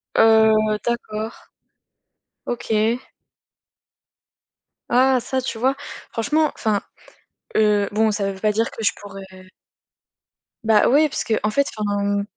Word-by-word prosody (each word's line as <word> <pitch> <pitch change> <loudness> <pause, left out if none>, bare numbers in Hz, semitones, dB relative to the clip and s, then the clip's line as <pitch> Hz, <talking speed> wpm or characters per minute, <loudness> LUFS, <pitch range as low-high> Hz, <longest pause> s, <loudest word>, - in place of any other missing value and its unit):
Heu, 220 -1 +4
D'accord. 220 -2 -3 1.1
OK. 230 0 0 1.9
Ah, 255 +1 +4
ça 260 +2 -2
tu 245 - -5
vois, 260 +4 +1 0.4
franchement, 300 +7 +1
enfin, 210 -2 0 0.8
heu, 210 -2 +3
bon, 220 +1 +2
ça 200 -1 -1
veut 190 - -11
pas 210 +2 +1
dire 225 +2 0
que 225 - -7
je - - +3
pourrais 190 -2 -12 1.2
Bah 220 -2 +4
oui, 300 +4 +4
parce - - -3
que 225 - 0
en 210 - +2
fait, 280 +6 +1
enfin. 205 -1 -1
220 Hz, 120 wpm, -21 LUFS, 205-240 Hz, 1.9 s, Heu